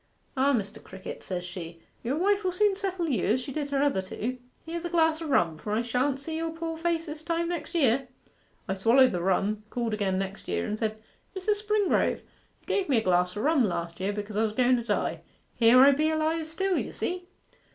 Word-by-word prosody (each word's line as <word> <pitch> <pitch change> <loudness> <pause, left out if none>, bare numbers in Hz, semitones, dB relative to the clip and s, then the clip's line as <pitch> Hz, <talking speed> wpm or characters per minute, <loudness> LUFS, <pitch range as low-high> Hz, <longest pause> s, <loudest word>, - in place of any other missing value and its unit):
"Ah, 270 +2 +3
Mr. 210 -6 -2
Crickett," 190 0 -8
says 180 -1 -4
she, 175 -2 -8 0.2
"your 255 +5 -1
wife 400 +4 +2
will 370 - +1
soon 400 +2 +2
settle 380 -3 -2
you 265 -6 0
as 230 +4 +3
she 265 +2 -6
did 290 -1 -3
her 280 0 +1
other 280 -10 +2
two: 235 +6 -4 0.3
here's 335 +1 -4
a 345 - -3
glass 320 -1 +2
o' 325 - -4
rum, 170 - +2
for 210 - -4
I 225 +2 +1
shan't 255 +3 0
see 315 +3 -4
your 330 0 -2
poor 325 0 -4
face 330 0 -1
this 305 -1 -7
time 335 +1 -1
next 350 0 -4
year." 270 -4 +3 0.6
I - - 0
swallered 230 +7 +5
the 175 - -2
rum, 195 +3 +1
called 235 -2 -2
again 200 -3 0
next 195 +1 -4
year, 85 -1 -1
and 215 - -3
said, 220 -1 -1 0.4
"Mrs. 415 +2 0
Springrove, 425 -2 +2 0.4
you - - -30
gave 385 -5 0
me 265 - +4
a 220 - +1
glass 180 0 +2
o' - - -2
rum 300 0 +3
last 170 -4 -2
year 190 +2 0
because 205 0 -5
I 215 - +2
was 220 -1 0
going 250 +2 +3
to 235 - -3
die 235 - -1 0.3
here 235 +1 +6
I 275 +1 +8
be 305 +3 +2
alive 315 0 0
still, 370 +3 0
you - - -4
see." 360 0 -4
265 Hz, 225 wpm, -28 LUFS, 210-330 Hz, 0.6 s, I